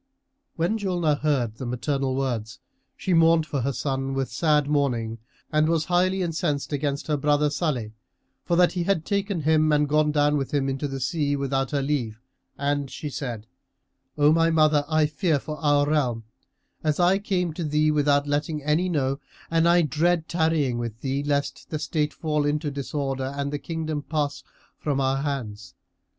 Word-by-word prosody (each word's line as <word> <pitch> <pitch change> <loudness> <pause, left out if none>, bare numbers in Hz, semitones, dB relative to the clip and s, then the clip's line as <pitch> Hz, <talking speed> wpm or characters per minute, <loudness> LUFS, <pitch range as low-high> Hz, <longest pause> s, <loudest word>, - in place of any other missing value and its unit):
When 175 +7 0
Julnar 175 -7 0
heard 130 -8 0
the 130 - -5
maternal 135 +2 -1
words, 120 -5 -2 0.4
she 185 - -1
mourned 165 -1 +5
for 140 -3 -2
her 140 +3 0
son 135 0 -2
with 135 -1 -2
sad 150 -3 +2
mourning 120 -6 0 0.3
and 155 +1 +3
was 165 -2 +1
highly 185 +1 +2
incensed 160 -4 -2
against 140 0 -1
her 150 -2 0
brother 145 +1 +2
Salih 135 -8 -1 0.5
for 170 - 0
that 175 0 +5
he 175 -2 -2
had 190 -4 +1
taken 200 -3 -1
him 155 0 +3
and 150 0 +3
gone 150 +1 +2
down 150 0 +2
with 140 +1 -2
him 135 -1 +1
into 135 +2 -2
the 135 -1 -5
sea 145 +2 0
without 135 -1 -1
her 140 -2 -1
leave; 125 -6 -2 0.4
and 140 -1 -1
she 150 +2 -6
said, 120 -6 -5 0.7
"O 145 0 +5
my 165 0 +3
mother, 155 -2 +3
I 155 -1 +3
fear 155 +1 +1
for 150 +2 -6
our 145 -2 +2
realm; 130 -7 0 0.6
as 155 0 0
I 180 +2 +4
came 180 -5 -1
to 170 - -4
thee 150 0 +2
without 145 -1 +2
letting 145 +1 -2
any 155 +5 +1
know; 135 -4 0 0.3
and 165 +1 +3
I 175 0 +5
dread 160 +3 +1
tarrying 160 -7 +1
with 115 -1 -5
thee, 135 +1 -1
lest 145 0 -2
the 155 - -2
state 150 0 -1
fall 150 -2 -1
into 145 +1 -1
disorder 135 -1 -3
and 140 0 -2
the 145 - -2
kingdom 160 -1 -3
pass 145 -3 -2 0.4
from 145 -3 -1
our 135 0 +1
hands. 130 -7 -4
150 Hz, 180 wpm, -25 LUFS, 135-160 Hz, 0.7 s, mourned